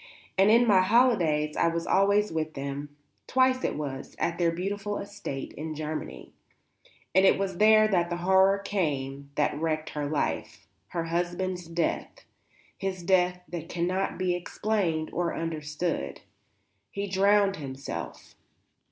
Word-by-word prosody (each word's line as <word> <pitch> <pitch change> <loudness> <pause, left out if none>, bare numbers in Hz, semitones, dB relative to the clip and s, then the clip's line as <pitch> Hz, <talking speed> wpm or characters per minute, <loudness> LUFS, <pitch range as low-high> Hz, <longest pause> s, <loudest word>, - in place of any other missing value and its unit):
And 195 +2 +5
in 235 +2 +6
my 200 -5 +5
holidays 185 -9 +3
I - - +2
was 165 0 -1
always 200 +2 +3
with 155 -1 -3
them, 140 +1 -5 0.3
twice 255 0 +3
it - - 0
was, 140 -3 -5
at 165 - -1
their 170 -1 +3
beautiful 200 +4 -3
estate 200 -9 -6
in 155 +1 -5
Germany. 155 0 -6 0.8
And 190 +2 +5
it 195 - +5
was 195 -2 -2
there 215 0 +6
that 175 -4 +1
the 175 - -1
horror 190 +2 +4
came 140 -9 -2
that 150 - +1
wrecked 155 -1 -1
her 145 -1 -3
life; 150 - -2 0.2
her 170 -2 -3
husband's 175 +1 -2
death, 170 0 -2 0.5
his 190 -2 -3
death 180 0 +2
that 165 -2 -6
cannot 180 +3 -1
be 185 -1 +1
explained 175 -3 -1
or 175 -1 -1
understood. 155 - -3 0.7
He 200 0 -4
drowned 195 +1 +3
himself. 135 -3 -7
175 Hz, 140 wpm, -28 LUFS, 155-195 Hz, 0.8 s, in